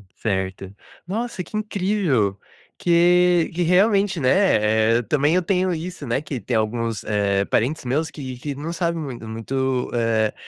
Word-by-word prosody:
Certo, 95 Hz, -1 st, -3 dB, 0.3 s
nossa 220 Hz, -1 st, -3 dB
que 175 Hz, -, -11 dB
incrível, 190 Hz, -, 0 dB, 0.4 s
que 175 Hz, 0 st, +4 dB
que 175 Hz, -, -2 dB
realmente, 195 Hz, +2 st, +3 dB
né, 115 Hz, -, +3 dB
eh, -, -, 0 dB
também 150 Hz, +5 st, +1 dB
eu 185 Hz, -, +3 dB
tenho 185 Hz, 0 st, +1 dB
isso, 170 Hz, -1 st, -6 dB
né, 125 Hz, +3 st, -1 dB
que 140 Hz, -4 st, -5 dB
tem 115 Hz, +4 st, -1 dB
alguns 115 Hz, -1 st, -2 dB, 0.4 s
parentes 130 Hz, +4 st, 0 dB
meus 150 Hz, +6 st, 0 dB
que 130 Hz, -5 st, -7 dB
que 140 Hz, +3 st, -5 dB
não 155 Hz, +5 st, -5 dB
sabe 170 Hz, 0 st, -1 dB
muito 135 Hz, -7 st, -6 dB
muito, 130 Hz, +3 st, -2 dB
eh, 115 Hz, -2 st, +1 dB
145 Hz, 150 wpm, -22 LUFS, 115-180 Hz, 0.4 s, que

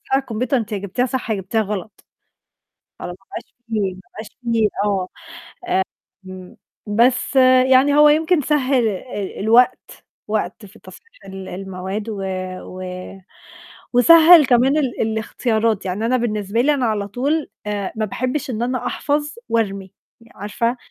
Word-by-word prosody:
الكمبيوتر 255 Hz, 0 st, -1 dB
أنتِ 220 Hz, -2 st, -4 dB
يا 210 Hz, -, -1 dB
جبتيها 200 Hz, +5 st, -2 dB
صح، 255 Hz, -1 st, -4 dB
يا -, -, +1 dB
جبتيها 195 Hz, +3 st, -1 dB
غلط. 210 Hz, 0 st, -6 dB, 1.0 s
خلاص 175 Hz, -, -6 dB
ما 195 Hz, -, -30 dB
بقاش -, -, -9 dB
في 225 Hz, -, -8 dB, 0.2 s
ما 185 Hz, -, -14 dB
بقاش 215 Hz, 0 st, -7 dB, 0.2 s
في 230 Hz, -2 st, +2 dB, 0.2 s
آه. 195 Hz, -3 st, 0 dB, 1.2 s
آمم، 185 Hz, -1 st, -11 dB, 0.3 s
بس 245 Hz, +5 st, +2 dB, 0.4 s
يعني 275 Hz, +3 st, +5 dB
هو 300 Hz, 0 st, +7 dB
يمكن 315 Hz, +2 st, +3 dB
سهّل 265 Hz, -4 st, +1 dB
ال 205 Hz, -1 st, -5 dB
الوقت، 230 Hz, +4 st, +2 dB, 0.2 s
وقت 210 Hz, -1 st, -3 dB
في 205 Hz, +3 st, -16 dB
تصحيح 460 Hz, 0 st, -16 dB
ال 190 Hz, -1 st, -8 dB
المواد 190 Hz, +3 st, -5 dB
و 205 Hz, -3 st, -5 dB, 0.4 s
و 185 Hz, 0 st, -9 dB, 1.1 s
وسهّل 325 Hz, +5 st, +8 dB
كمان 255 Hz, +3 st, +3 dB
ال 265 Hz, -6 st, -1 dB
الاختيارات، 220 Hz, -1 st, -1 dB
يعني 190 Hz, +4 st, -2 dB
أنا 255 Hz, +2 st, +2 dB
بالنسبة 215 Hz, -2 st, -1 dB
لي 295 Hz, +4 st, +3 dB
أنا 265 Hz, -3 st, 0 dB
على 210 Hz, -3 st, -1 dB
طول 280 Hz, +9 st, -1 dB, 0.2 s
آآ 205 Hz, -2 st, -3 dB
ما 220 Hz, 0 st, -1 dB
باحبّش 255 Hz, +7 st, -3 dB
إن 230 Hz, -3 st, -3 dB
أنا 250 Hz, +1 st, -2 dB
أحفظ 295 Hz, 0 st, -2 dB
وأرمي، 195 Hz, -4 st, -1 dB, 0.4 s
عارفة، 230 Hz, +5 st, -2 dB
225 Hz, 145 wpm, -20 LUFS, 205-255 Hz, 1.2 s, وسهّل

